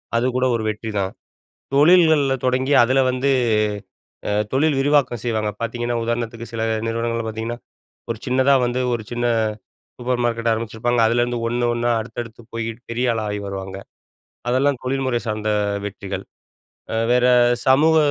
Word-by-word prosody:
அது 115 +1 +2
கூட 130 0 +2
ஒரு 115 - -2
வெற்றிதான். 105 -3 -2 0.6
தொழில்கள்ல 155 -3 +5
தொடங்கி 130 +2 +1
அதுல 130 +3 +2
வந்து, 130 +2 0 1.0
அ - - 0 0.2
தொழில் 145 +2 +2
விரிவாக்கம் 135 -4 +2
செய்வாங்க. 110 -3 0
பார்த்தீங்கன்னா 120 +1 -2
உதாரணத்துக்கு 115 0 -3
சில 115 -1 -3 0.2
நிறுவனங்கள்ல 115 0 -1
பாத்தீங்கன்னா 110 +2 -4 0.5
ஒரு 115 - -4
சின்னதா 130 +2 +3
வந்து, 120 +1 -1
ஒரு 115 -2 -2
சின்ன 120 0 -2 0.7
சூப்பர் 125 0 -1
மார்க்கெட் 115 -1 0
ஆரம்பிச்சிருப்பாங்க, 115 +2 -1
அதுலருந்து 120 +1 +1
ஒண்ணு, 120 +1 0
ஒண்ணா 120 0 0
அடுத்தடுத்துப் 115 0 -8
போய் 115 -1 -2 0.2
பெரிய 120 +1 +1
ஆளா 110 -1 -2
ஆயி 105 - -3
வருவாங்க. 95 -1 -6 0.7
அதெல்லாம் 130 +1 +2
தொழில்முறை 130 -2 0
சார்ந்த 110 0 -2 0.4
வெற்றிகள். 100 -1 -5 0.7
அ - - -1 0.2
வேற 125 0 +4 0.4
சமூக 155 +5 +5
120 Hz, 135 wpm, -21 LUFS, 115-130 Hz, 1.0 s, தொழில்கள்ல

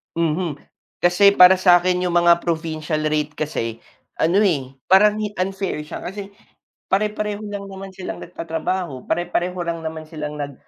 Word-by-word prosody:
Mhm. 165 -2 -1 0.4
Kasi 200 +3 +5
para 185 0 +8
sa 180 -2 +5
'kin 180 0 0
yung 175 - -1
mga 170 0 +5
provincial 160 -2 -2
rate 150 -1 -1
kasi 115 -8 -4 0.3
ano 170 +5 +1
eh, 140 -8 0 0.2
parang 210 +3 +5
hi 210 -1 -3
unfair 190 -4 -2
siya 150 - -8
kasi 195 +2 -6 0.6
pare-pareho 210 +1 -1
lang 200 -1 -5
naman 195 0 -8
silang 185 -1 -7
nagtatrabaho, 165 -3 -4
pare-pareho 175 +1 -1
lang 165 -1 -3
naman 160 0 -6
silang 150 -2 -6
nag 145 -1 -5
175 Hz, 150 wpm, -21 LUFS, 155-190 Hz, 0.6 s, para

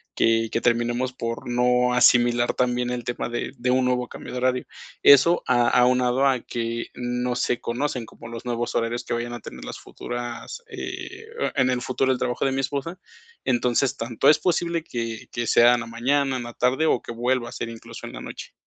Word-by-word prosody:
que 115 0 +2
que 115 - 0
terminemos 120 +2 +1
por 115 0 -5
no 125 0 +2
asimilar 120 -1 +4
también 125 -1 0
el 120 -1 -3
tema 120 0 -3
de 120 - -3
de 125 +1 0
un 130 0 +3
nuevo 125 -1 0
cambio - - -9
de 125 - -5
horario. 125 0 0 0.4
Eso 140 +5 +7
a 120 -1 +3
aunado 125 +1 +3
a 130 -2 +3
que 115 0 -3 0.2
no 125 0 -2
se 125 -1 0
conocen 125 0 -2
como 115 - -12
los 115 +1 -8
nuevos 120 -1 -2
horarios 120 +1 -1
que - - -4
vayan 120 0 -3
a 120 - -5
tener - - -10
las - - -7
futuras, 120 - -6
eh, 450 0 -7 0.3
en 130 -2 +3
el 125 -1 -1
futuro 130 +1 0
el 130 - 0
trabajo 125 +1 -1
de 135 - +2
mi 135 0 0
esposa. 145 +7 -3 0.4
Entonces, 125 +2 +1
tanto 115 0 -1
es 150 - +6
posible 170 -2 0
que 115 -6 -5
que 120 -1 -2
sea 120 +1 +6
en 120 - -2
la - - -5
mañana, 130 +3 +1
en 120 - -4
la 120 0 -8
tarde 130 +6 +1
o 125 - +2
que - - -8
vuelva 120 +1 0
a - - -11
ser 115 - -5
incluso 115 -1 -9
en - - -10
la - - -7
noche. - - -8
125 Hz, 210 wpm, -24 LUFS, 120-130 Hz, 0.4 s, Eso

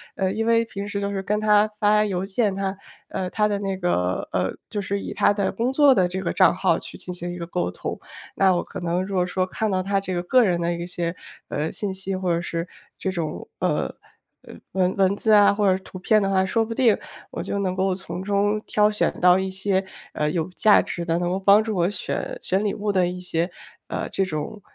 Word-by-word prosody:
呃， 190 -1 0
因 220 +3 -1
为 230 0 +4
平 200 -3 -6
时 200 0 -3
都 200 0 -2
是 195 -1 -2
跟 210 +2 -1
他 210 0 +4
发 210 0 +4
邮 190 -2 -2
件 200 0 0
他 195 0 -2 0.3
呃， 185 - -3
他 210 +2 +1
的 205 -1 -1
那 195 -1 -2
个 95 - -1
呃， - - 0 0.2
就 205 - -3
是 200 +1 -2
以 - - -5
他 - - +3
的 200 -2 0
工 245 +3 -1
作 285 -1 +6
的 185 -7 +3
这 185 +2 -4
个 - - -1
账 - - +4
号 - - +2
去 - - -9
进 180 - -7
行 175 0 -5
一 - - -7
个 170 - -5
沟 175 +1 -2
通。 - - -5 0.4
那 190 -2 +4
我 175 - 0
可 - - -8
能 175 +1 -1
如 200 - -6
果 180 -1 +2
说 185 +1 0
看 215 +4 -2
到 185 -2 0
他 195 +1 +1
这 190 -1 -4
个 175 0 -2
个 250 +7 +4
人 175 -5 +1
的 170 0 0
一 170 0 -5
些， 170 -1 -2 0.4
呃， 150 +2 -1
信 200 -2 -3
息， 190 0 -3
或 185 -2 0
者 170 - +1
是 170 0 -3 0.3
这 190 - -2
种， 165 -4 -4
呃 - - 0 0.5
呃， - - -12 0.2
文 185 0 +1
文 195 0 +3
字 220 +2 +1
啊 205 -1 +7
或 200 -1 +2
者 190 - -6
图 185 - -10
片 215 +3 +3
的 195 - 0
话， 190 -1 +2
说 225 +4 +1
不 230 - -5
定 230 -2 +4 0.3
我 - - -4
就 - - -3
能 185 -2 -1
够 190 0 +1
从 180 -1 -6
中 205 +2 +1
挑 210 0 +3
选 210 - 0
到 180 0 +6
一 190 0 -2
些， 190 0 0 0.3
呃， 150 0 0
有 160 +1 -1
价 215 -1 +5
值 175 - -5
的， 165 0 +1
能 175 0 -1
够 190 - -1
帮 200 +2 +6
助 220 -1 -3
我 175 0 +2
选 - - -3
选 195 +2 0
礼 205 - 0
物 205 0 -1
的 185 -3 +2
一 180 +1 -5
些， 175 -1 -1 0.4
呃， - - -3
这 195 - 0
种， 160 +4 -5
190 Hz, 265 characters per minute, -23 LUFS, 180-205 Hz, 0.5 s, 啊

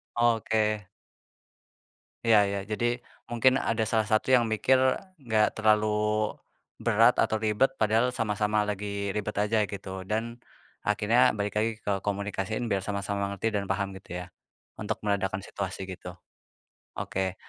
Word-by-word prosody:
Oke. 110 -3 +1 1.4
Ya 105 -3 +6
ya. 100 0 -2
Jadi, 105 +3 -2 0.4
mungkin 130 +3 +3
ada 115 -3 0
salah 110 0 +1
satu 110 +4 +1
yang 125 -3 +5
mikir, 110 +4 +3 0.5
nggak 110 -1 +2
terlalu 110 -1 +4 1.0
berat 115 +1 +5
atau - - +2
ribet, 110 +5 +2
padahal 110 +3 +2
sama-sama 105 -1 +1
lagi 105 0 -3 0.3
ribet 105 0 -2
aja 110 +1 +1
gitu. 95 0 -7 0.2
Dan 115 +2 -2 0.5
akhirnya 110 +4 +3
balik 100 0 -2
lagi 110 +2 +1
ke 105 - -2 0.2
komunikasiin, 100 +2 -2
biar 100 - +2
sama-sama 100 0 -2
ngerti 100 +3 -4
dan 100 - -3
paham 100 -1 0
gitu 95 - -23
ya, - - -7 0.5
untuk - - -3
meredakan 100 -2 -1
situasi 100 -1 -5
gitu. 90 -1 -8 0.8
Oke. 95 -1 -2
105 Hz, 135 wpm, -28 LUFS, 100-115 Hz, 1.4 s, Ya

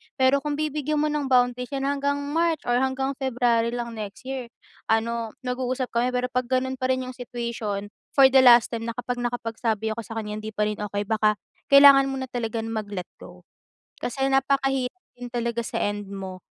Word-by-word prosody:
Pero 265 +1 +4
kung 295 0 -3
bibigyan 300 0 -1
mo 305 - +1
ng 295 -2 -1
boundaries 250 -1 +2
hanggang 280 +1 0 0.2
March 330 -1 +1
or 245 0 +1
hanggang 265 +1 0
February 240 -2 +1
lang 235 -1 -4
next 215 0 -7
year, 260 -2 -5 0.4
ano 225 0 0
nag-uusap 255 0 -2
kami 245 +2 0
pero 250 0 -1
'pag 250 0 -1
ganun 260 0 -1
pa 255 - 0
rin 260 0 0
'yung 255 - -6
situation 235 -5 -4 0.2
for 265 -2 +7
the 270 - +7
last 240 -3 +7
time 230 -1 -4
na 230 - -4
kapag 245 0 -3
nakapagsabi 230 -2 -2
ako 225 - -4
sa 225 0 -7
kanya 210 -1 -4
hindi 215 0 -8
pa 210 - +1
rin 210 0 -2
okey 205 0 -2
baka 215 0 +2 0.3
kailangan 280 -1 +8
mo 270 -1 -3
na 260 - -5
talagang 225 -2 -3
mag-let 205 -5 -4
go. - - -13 0.6
Kasi 270 +2 -1
napakahirap 270 +3 +1 0.2
din 245 0 -7
talaga 235 -1 -1
sa - - -3
end 205 0 -2
mo 190 -1 -6
245 Hz, 190 wpm, -25 LUFS, 225-265 Hz, 0.6 s, kailangan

